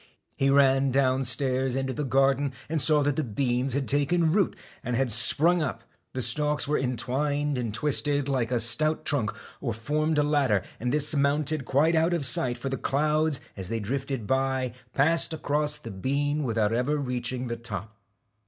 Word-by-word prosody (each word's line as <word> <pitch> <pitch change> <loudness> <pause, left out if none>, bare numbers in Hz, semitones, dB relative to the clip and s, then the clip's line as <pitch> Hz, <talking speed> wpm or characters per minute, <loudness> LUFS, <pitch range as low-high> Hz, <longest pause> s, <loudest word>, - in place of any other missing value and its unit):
He 135 - +1
ran 135 -1 +4
down 130 0 +1
stairs 130 +1 +1
into 135 0 -2
the 150 - -3
garden, 135 0 +2 0.2
and 160 -1 0
saw 150 -1 +4
that 145 -1 0
the 155 - +1
beans 125 +2 -1
had 135 0 -1
taken 155 +4 +2
root, 195 0 +1 0.3
and 125 - -2
had 130 -1 0
sprung 155 +10 +3
up; 125 -6 -3 0.3
the 130 - 0
stalks 150 +5 +1
were 150 - +1
en 125 -2 -2
twined 145 +4 0
and 115 -3 -2
twisted 145 +3 0
like 130 -4 0
a 120 - +1
stout 155 +8 0
trunk, 125 -7 0 0.3
or 120 -5 -3
formed 150 +6 -1
a 150 - +4
ladder, 140 -9 +2 0.2
and 125 +2 -1
this 150 +2 0
mounted 145 0 0
quite 150 +6 +2
out 165 +2 +2
of 155 -5 -1
sight, 125 -1 +1
for 135 +3 -4
the 135 - -2
clouds 150 +1 0
as 95 -2 -6
they 115 - -2
drifted 130 +2 -3
by 130 0 0 0.2
passed 160 +3 +2
across 150 0 -1
the 115 - -9
bean 140 +9 -1
without 110 -3 0 0.3
reaching 125 0 -3
the 120 -1 -3
top. 110 -2 -7
135 Hz, 180 wpm, -26 LUFS, 125-150 Hz, 0.3 s, ran